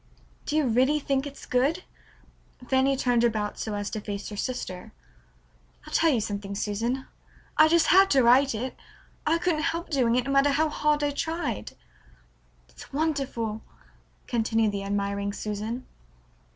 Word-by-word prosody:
"Do 300 Hz, -, -1 dB
you 310 Hz, -2 st, +3 dB
really 260 Hz, +5 st, +3 dB
think 275 Hz, 0 st, -1 dB
it's 280 Hz, -, -10 dB
good?" 280 Hz, +8 st, +1 dB, 0.8 s
Fanny 270 Hz, +1 st, +2 dB
turned 245 Hz, -2 st, +2 dB
about 215 Hz, -3 st, 0 dB
so 215 Hz, -2 st, -3 dB
as 205 Hz, 0 st, -3 dB
to 215 Hz, -, -4 dB
face 200 Hz, -1 st, -5 dB
her 210 Hz, -, -7 dB
sister. 195 Hz, -5 st, -5 dB, 0.9 s
"I'll -, -, -11 dB
tell 330 Hz, -, +4 dB
you 255 Hz, -6 st, +2 dB
something, 200 Hz, -1 st, -4 dB
Susan. 230 Hz, +6 st, -2 dB, 0.5 s
I 310 Hz, -, +7 dB
just 335 Hz, 0 st, +4 dB
had 385 Hz, +1 st, +6 dB
to 270 Hz, -6 st, +4 dB
write 255 Hz, +2 st, +5 dB
it. 250 Hz, +4 st, -4 dB, 0.5 s
I 325 Hz, +2 st, +3 dB
couldn't 335 Hz, -3 st, 0 dB
help 335 Hz, +2 st, -2 dB
doing 245 Hz, -5 st, +2 dB
it, 250 Hz, -, +2 dB
no 275 Hz, -, -2 dB
matter 275 Hz, +1 st, +4 dB
how 310 Hz, +3 st, +2 dB
hard 300 Hz, 0 st, +1 dB
I 290 Hz, -, +1 dB
tried." 325 Hz, +4 st, -3 dB, 0.9 s
"It's -, -, -14 dB
wonderful," 275 Hz, -8 st, -2 dB, 0.6 s
continued 225 Hz, -2 st, +1 dB
the 200 Hz, -1 st, -4 dB
admiring 200 Hz, 0 st, -2 dB
Susan. 215 Hz, +5 st, -4 dB
255 Hz, 155 wpm, -26 LUFS, 215-295 Hz, 0.9 s, I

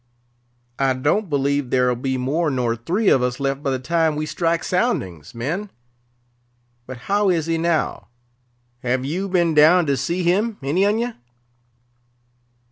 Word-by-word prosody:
I 135 Hz, -1 st, +2 dB
don't 150 Hz, +10 st, 0 dB
believe 140 Hz, -2 st, 0 dB
there'll 125 Hz, -1 st, +2 dB
be 130 Hz, +2 st, -2 dB
more 150 Hz, +6 st, 0 dB
nor 125 Hz, -4 st, 0 dB
three 180 Hz, -, 0 dB
of 130 Hz, -, +4 dB
us 125 Hz, 0 st, -1 dB
left 135 Hz, 0 st, -1 dB
by 140 Hz, -, -2 dB
the 130 Hz, -, 0 dB
time 160 Hz, +3 st, 0 dB
we 155 Hz, +1 st, -2 dB
strike 165 Hz, +1 st, -1 dB
soundings, 125 Hz, -, -2 dB
men. 165 Hz, -, -3 dB, 1.2 s
But 130 Hz, 0 st, -7 dB
how 205 Hz, 0 st, +2 dB
is 165 Hz, -4 st, +1 dB
he 165 Hz, 0 st, -1 dB
now? 165 Hz, -1 st, -1 dB, 0.7 s
Have 125 Hz, +1 st, -1 dB
you 185 Hz, +7 st, -3 dB
been 175 Hz, -3 st, +2 dB
down 160 Hz, +4 st, +6 dB
to 140 Hz, -2 st, +1 dB
see 170 Hz, +8 st, -2 dB
him, 205 Hz, +6 st, +1 dB
any 175 Hz, +9 st, +2 dB
on 210 Hz, +2 st, +1 dB
ye? 240 Hz, +1 st, -2 dB
155 Hz, 155 wpm, -21 LUFS, 130-180 Hz, 1.2 s, down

